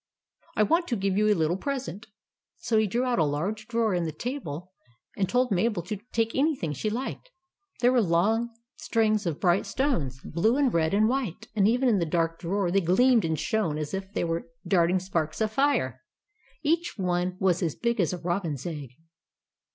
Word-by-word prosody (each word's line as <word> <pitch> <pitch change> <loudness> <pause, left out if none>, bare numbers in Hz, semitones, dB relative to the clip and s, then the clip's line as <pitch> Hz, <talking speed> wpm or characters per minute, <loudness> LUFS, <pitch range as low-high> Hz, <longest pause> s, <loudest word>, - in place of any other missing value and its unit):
I 215 - +4
WANT 340 - +2
TO 240 - 0
GIVE 195 -2 0
YOU 210 +1 +3
A - - +4
LITTLE 165 +2 +1
PRESENT." 245 - -4 0.5
So 220 -2 +1
he 215 - +2
drew 235 +6 0
out 250 -6 +1
a - - +5
large 185 +9 -2
drawer 230 -3 +1
in 175 -1 0
the 160 - -2
table, 180 - -5 0.4
and 190 -3 0
told 250 -1 +2
Mabel 195 -1 +1
to 205 +5 -4
take 225 0 0
anything 270 - 0
she 215 - -2
liked. 260 - -4 0.5
There 245 +1 +5
were 250 -2 +4
long 210 +6 +2 0.3
strings 215 -4 +1
of 160 -4 -2
bright 180 0 +2
stones, 160 - -1
blue 220 - +1
and 275 -4 +2
red 165 +2 +2
and 215 +1 +4
white; 230 -4 -2
and 200 -2 +4
even 250 +4 +2
in 215 -5 +3
the 170 - 0
dark 165 0 0
drawer 185 +1 -1
they 195 +2 +3
gleamed 230 +5 +4
and 160 -1 0
shone 210 -9 0
as 150 +1 -4
if 190 0 -4
they - - -1
were 165 0 -2 0.2
darting 175 0 +3
sparks 170 -4 -2
of 215 -1 0
fire. 220 - +1 0.6
Each 335 +3 +1
one 180 -1 -1
was 180 -2 +2
as 165 -5 -1
big 235 -1 -1
as 170 - +1
a 180 - -3
robin's 170 -5 -2
egg. 145 -7 -6
195 Hz, 200 wpm, -27 LUFS, 170-235 Hz, 0.6 s, a